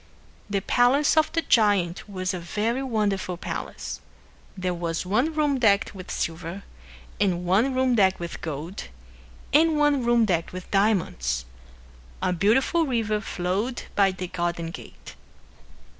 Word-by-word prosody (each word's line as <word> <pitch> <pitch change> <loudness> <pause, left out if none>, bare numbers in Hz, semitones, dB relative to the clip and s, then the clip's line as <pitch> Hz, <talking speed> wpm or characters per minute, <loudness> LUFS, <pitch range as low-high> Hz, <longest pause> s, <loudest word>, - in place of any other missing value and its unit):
The 200 -1 0
palace 255 - +3
of 315 -1 +3
the 330 -1 +1
giant 205 -7 +2
was 185 -1 -2
a 180 - -3
very 215 +9 -1
wonderful 205 -8 -1
palace. - - -6 0.6
There 185 -1 -1
was 170 0 -3
one 245 - +1
room 295 -3 +1
decked 205 -5 +3
with 185 -2 -10
silver, 165 +4 -4 0.6
and 180 -3 +1
one 220 +9 +2
room 260 -1 +2
decked 190 -4 +3
with 170 -1 -6
gold, 160 +4 -5 0.7
and 315 +1 +5
one 295 -3 +3
room 235 -1 +4
decked 175 -5 -1
with 185 0 -8
diamonds. 170 - +1 0.7
A 180 - 0
beautiful 260 - +2
river 220 -4 0
flowed 200 +7 -2
by 195 -1 +4
the 185 -1 -5
garden 170 -1 -3
gate. - - -11
200 Hz, 140 wpm, -25 LUFS, 180-245 Hz, 0.7 s, and